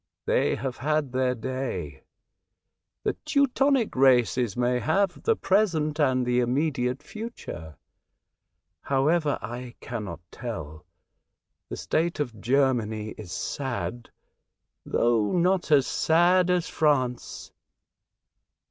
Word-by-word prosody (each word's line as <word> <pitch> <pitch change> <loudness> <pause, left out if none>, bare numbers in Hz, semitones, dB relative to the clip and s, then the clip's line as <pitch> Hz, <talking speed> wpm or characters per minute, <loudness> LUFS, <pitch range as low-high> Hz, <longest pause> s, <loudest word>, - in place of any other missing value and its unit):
They - - +2
have 135 -2 -4
had 150 -1 0
their 130 0 +1
day. 115 - -4 1.0
The - - +1
Teu 290 -2 +3
tonic 270 -2 +1
races 125 -4 +3
may 125 0 +1
have 190 - 0
the 455 - +2
present 170 - +1
and 130 -4 +2
the 125 0 +2
immediate 130 +1 0
future. 150 - -8 1.1
However, 145 +2 +1
I 120 +2 -6
cannot 105 -8 -6
tell. 80 +4 -7 0.8
The - - -5
state 170 +1 -1
of 120 -8 -3
Germany 120 -5 +1
is 105 -5 -9
sad, 120 -2 -4 0.8
though 115 -3 +2
not 180 0 +2
as 145 -3 +5
sad 175 +3 +3
as 180 -2 +1
France." 130 -6 0
130 Hz, 105 wpm, -26 LUFS, 120-165 Hz, 1.1 s, as